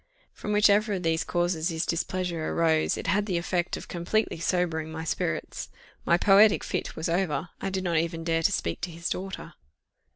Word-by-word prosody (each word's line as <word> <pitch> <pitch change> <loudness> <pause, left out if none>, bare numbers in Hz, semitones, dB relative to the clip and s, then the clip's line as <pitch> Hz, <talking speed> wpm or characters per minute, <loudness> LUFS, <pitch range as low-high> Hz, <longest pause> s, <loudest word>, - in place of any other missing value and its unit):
From 210 - -5
whichever 210 0 +4
of 185 -2 -3
these 165 -1 +1
causes 175 -2 0
his 165 0 -1
displeasure 170 -1 -2
arose, 160 -2 +2
it - - -6
had 205 +2 +1
the 180 -4 0
effect 175 0 -1
of - - -9
completely 175 +2 -1
sobering 165 -3 0
my 160 0 -5
spirits. 160 - -3 0.4
My 170 - +5
poetic 200 +3 +5
fit - - -3
was 160 - -3
over. 170 -1 0
I - - -1
did 190 -1 -2
not 170 -3 +1
even 165 0 -1
dare 165 0 +1
to 180 - +3
speak - - -2
to 175 - -3
his 170 +1 -4
daughter. 190 -3 -5
175 Hz, 190 wpm, -27 LUFS, 165-190 Hz, 0.4 s, My